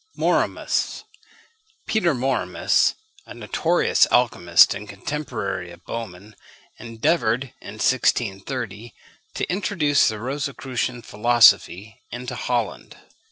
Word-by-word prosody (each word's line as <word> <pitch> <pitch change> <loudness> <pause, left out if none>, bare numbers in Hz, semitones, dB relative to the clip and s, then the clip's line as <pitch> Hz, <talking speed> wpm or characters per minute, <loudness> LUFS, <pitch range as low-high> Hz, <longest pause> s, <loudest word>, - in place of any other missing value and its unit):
MORMIUS. - - 0 0.8
Peter 175 -9 +1
Mormius, 130 +2 +1 0.3
a - - -10
notorious 170 +2 +2
alchymist 90 -8 +4
and 100 +1 -9
contemporary 110 -5 -4
of 85 0 -16
Böhmen, 105 -2 -7 0.5
endeavoured, 120 +1 -1
in - - -9
1630, 110 +2 -1 0.4
to - - -2
introduce 180 -7 +1
the 110 -1 -2
Rosicrucian 130 -1 -4
philosophy 110 -3 +3
into 125 +1 -6
Holland. 120 -3 -3
120 Hz, 90 wpm, -22 LUFS, 105-135 Hz, 0.8 s, alchymist